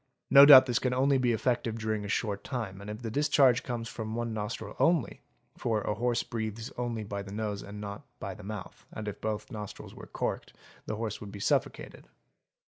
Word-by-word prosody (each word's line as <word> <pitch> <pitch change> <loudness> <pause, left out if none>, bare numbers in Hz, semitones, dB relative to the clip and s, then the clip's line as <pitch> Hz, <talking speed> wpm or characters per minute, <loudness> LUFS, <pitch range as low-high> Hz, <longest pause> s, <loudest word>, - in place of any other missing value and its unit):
' - - -55
No 140 - +10
doubt 130 -3 +11
this 120 -3 +1
can 125 -1 0
only 135 +1 +3
be 125 -1 +2
effective 115 0 0
during 110 -1 -2
a - - -5
short 100 -1 -1
time 110 -7 -5
and 100 - -8
if 105 +3 -7
the 115 - -3
dis 145 +5 +1
charge 130 -4 +5
comes 120 -2 -4
from 110 -2 -5
one 120 -1 -2
nostril 105 0 -5
only, 165 - +2 0.3
for 115 -4 -1
a 105 - -1
horse 120 +3 0
breathes 110 0 -5
only 120 -3 -3
by 100 -1 -5
the 100 0 -9
nose 105 -1 -3
and 105 +1 -9
not 100 -1 -6 0.2
by - - -5
the - - -12
mouth 105 0 -8
and 110 -1 -6
if 105 - -6
both 110 +1 -3
nostrils 105 -3 -8
were - - -11
corked - - -3 0.3
the - - -2
horse 110 0 -4
would 100 -2 -8
be 100 - -8
suffocated. - - -1
110 Hz, 215 wpm, -29 LUFS, 105-120 Hz, 0.3 s, doubt